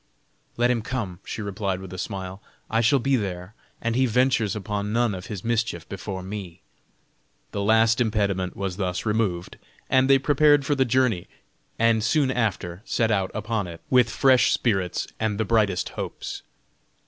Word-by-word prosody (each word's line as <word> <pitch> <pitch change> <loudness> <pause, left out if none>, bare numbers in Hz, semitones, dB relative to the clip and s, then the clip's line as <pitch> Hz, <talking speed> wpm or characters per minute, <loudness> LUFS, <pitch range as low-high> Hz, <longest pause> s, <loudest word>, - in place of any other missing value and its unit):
"Let 120 +1 +3
him 120 -2 0
come," 105 -7 -4
she 110 - -5
replied 100 -2 -2
with 95 -1 -9
a 95 - -6
smile, 95 +1 -5 0.3
"I 115 +1 +3
shall 120 +5 +4
be 135 +1 +1
there, 95 -3 -4 0.3
and 115 0 -1
he 130 +1 +3
ventures 120 -3 +2
upon 105 0 -3
none 115 -1 +2
of 90 -1 -7
his 100 -4 -6
mischief 115 -7 -1
before 95 -1 -6
me." 95 -2 -7 0.9
The 100 - -3
last 110 +2 +4
impediment 100 -5 0
was 95 -2 -3
thus 90 -1 -2
removed; 105 -5 -1 0.3
they 130 +1 +5
prepared 145 +1 +4
for 145 - +1
the 135 -2 +2
journey, 120 -7 +1 0.5
and 115 -1 +3
soon 135 +3 +2
after 100 -7 -2
set 115 -2 0
out 95 -3 +1
upon 110 -2 -2
it 85 -1 -9
with 125 -3 +5
fresh 130 0 +4
spirits 95 -7 0
and 110 -2 -1
the 110 - +1
brightest 105 -4 +1
hopes. - - -6
110 Hz, 165 wpm, -25 LUFS, 95-120 Hz, 0.9 s, they